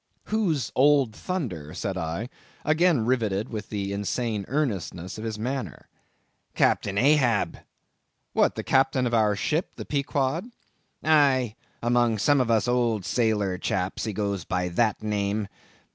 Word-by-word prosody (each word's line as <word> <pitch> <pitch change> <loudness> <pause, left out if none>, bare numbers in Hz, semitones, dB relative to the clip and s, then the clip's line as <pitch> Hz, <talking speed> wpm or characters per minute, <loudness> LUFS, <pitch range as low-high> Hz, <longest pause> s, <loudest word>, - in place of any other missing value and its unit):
"Who's 170 - 0
Old 135 -4 +4
Thunder?" 100 - -4
said 100 -3 -3
I, 85 +5 -3 0.4
again 155 -6 +3
riveted 110 -5 0
with 105 -3 -6
the 100 -2 -3
insane 105 +1 -2
earnestness 100 - -2
of - - -6
his 110 -1 -3
manner. 120 - -4 0.7
"Captain 100 0 +2
Ahab." 125 -4 +3 0.7
"What! - - +3
the - - -4
captain 135 -1 +2
of 120 - -1
our 105 -2 +3
ship, 155 - -1
the - - -7
Pequod?" 140 - -1 0.5
"Aye, 140 -7 +4 0.3
among 120 -1 +2
some 140 +6 +3
of 125 - -1
us 115 0 +2
old 120 -5 +1
sailor 105 -6 0
chaps, 90 +4 -2
he 110 - -2
goes 100 -3 -2
by 90 0 -1
that 110 +4 +1
name. 105 0 -1
115 Hz, 140 wpm, -26 LUFS, 100-135 Hz, 0.7 s, Old